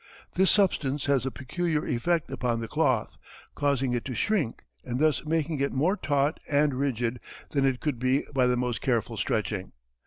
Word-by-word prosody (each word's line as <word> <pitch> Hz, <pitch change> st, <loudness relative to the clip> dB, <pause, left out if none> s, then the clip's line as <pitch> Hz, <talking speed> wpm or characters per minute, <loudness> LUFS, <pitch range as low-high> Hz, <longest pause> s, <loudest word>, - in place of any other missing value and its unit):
This 190 Hz, +1 st, +3 dB
substance 150 Hz, -9 st, +2 dB
has 135 Hz, -2 st, +2 dB
a -, -, +1 dB
peculiar 155 Hz, +5 st, -2 dB
effect 165 Hz, +7 st, 0 dB
upon 120 Hz, -2 st, -1 dB
the 115 Hz, -, -4 dB
cloth, 130 Hz, -, 0 dB, 0.3 s
causing 135 Hz, -3 st, +1 dB
it 120 Hz, -2 st, -1 dB
to 130 Hz, -, -4 dB
shrink, 175 Hz, -, 0 dB, 0.2 s
and 125 Hz, 0 st, -3 dB
thus 155 Hz, 0 st, +2 dB
making 160 Hz, -1 st, 0 dB
it 140 Hz, -, +1 dB
more 160 Hz, +9 st, +2 dB
taut 145 Hz, -5 st, 0 dB
and 145 Hz, 0 st, +3 dB
rigid 125 Hz, -3 st, -1 dB, 0.3 s
than 140 Hz, -2 st, +2 dB
it 130 Hz, -2 st, 0 dB
could 145 Hz, -6 st, -1 dB
be 130 Hz, +3 st, +1 dB
by 130 Hz, -2 st, +3 dB
the 125 Hz, 0 st, +2 dB
most 125 Hz, -1 st, -1 dB
careful 115 Hz, -3 st, 0 dB
stretching. 105 Hz, -2 st, -2 dB
135 Hz, 180 wpm, -27 LUFS, 125-150 Hz, 0.3 s, This